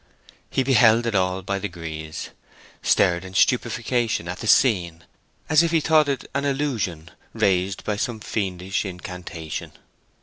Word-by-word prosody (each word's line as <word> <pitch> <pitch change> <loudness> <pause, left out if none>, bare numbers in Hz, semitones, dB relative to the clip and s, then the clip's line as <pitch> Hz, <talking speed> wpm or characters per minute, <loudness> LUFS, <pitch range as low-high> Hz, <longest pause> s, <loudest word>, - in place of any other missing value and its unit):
He 135 - +1
beheld 120 -3 +5
it 115 - -1
all 95 -1 0
by 100 +1 -2
degrees, 80 -4 -6 0.5
stared 85 0 +3
in 95 0 -10
stupefaction 120 -4 +1
at 90 +1 -5
the 110 - -5
scene, 90 -10 +3 0.4
as 155 0 +5
if 170 - +1
he 165 0 +3
thought 155 -1 +3
it 135 -2 -2
an 140 +1 -1
illusion 120 - -2 0.2
raised 95 0 +1
by 105 -1 -2
some 115 0 -2
fiendish 95 -3 -2
incantation. 90 -4 -7
100 Hz, 140 wpm, -23 LUFS, 90-125 Hz, 0.5 s, beheld